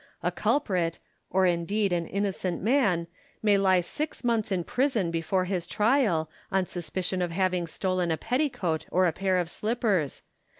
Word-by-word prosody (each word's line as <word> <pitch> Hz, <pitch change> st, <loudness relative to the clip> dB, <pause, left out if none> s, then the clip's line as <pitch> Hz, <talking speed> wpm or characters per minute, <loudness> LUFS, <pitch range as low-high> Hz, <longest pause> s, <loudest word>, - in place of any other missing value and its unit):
A -, -, +1 dB
culprit, 180 Hz, -, 0 dB, 0.3 s
or 190 Hz, +1 st, +3 dB
indeed 185 Hz, +3 st, +1 dB
an 170 Hz, -1 st, -1 dB
innocent 195 Hz, -3 st, -2 dB
man, 205 Hz, -8 st, +2 dB, 0.4 s
may 210 Hz, -2 st, +5 dB
lie 190 Hz, -2 st, +4 dB
six 295 Hz, -, -4 dB
months 230 Hz, -3 st, 0 dB
in 180 Hz, -2 st, 0 dB
prison 235 Hz, -7 st, 0 dB
before 170 Hz, +3 st, 0 dB
his 180 Hz, -2 st, -2 dB
trial, 210 Hz, -, +2 dB, 0.2 s
on 190 Hz, -1 st, +2 dB
suspicion 180 Hz, +1 st, -3 dB
of 175 Hz, -, 0 dB
having 180 Hz, 0 st, 0 dB
stolen 185 Hz, 0 st, -1 dB
a 160 Hz, -, +1 dB
petticoat 225 Hz, -, -1 dB
or 180 Hz, -1 st, +3 dB
pair 190 Hz, +2 st, 0 dB
of 175 Hz, -2 st, 0 dB
slippers. 210 Hz, -, -1 dB
185 Hz, 155 wpm, -27 LUFS, 175-210 Hz, 0.4 s, may